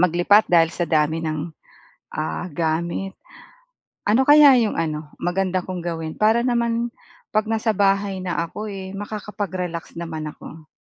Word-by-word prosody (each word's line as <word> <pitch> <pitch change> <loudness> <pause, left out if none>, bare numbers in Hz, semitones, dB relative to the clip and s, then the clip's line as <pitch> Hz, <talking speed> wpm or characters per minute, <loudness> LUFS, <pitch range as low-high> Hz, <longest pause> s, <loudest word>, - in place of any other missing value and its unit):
maglipat 180 +4 +4
dahil 165 -2 +5
sa 175 - -1
dami 155 0 +1
ng, 155 +1 -3 0.6
ah, 155 +3 -3
gamit. 170 +4 -2 0.9
Ano 225 +6 +4
kaya 290 -2 +8
'yong 220 -2 0
ano, 155 -2 -3
maganda 185 +1 0
kong 180 -2 -5
gawin 165 -2 -4
para 220 +2 +4
naman 235 -1 0 0.4
'pag 215 0 +1
nasa 225 0 +1
bahay 195 -1 +2
na 180 - -2
ako 190 +6 -5 0.3
makakapag-relax 195 -5 -5
naman 160 -2 -5
ako? 155 -2 -12
180 Hz, 135 wpm, -22 LUFS, 165-210 Hz, 0.9 s, kaya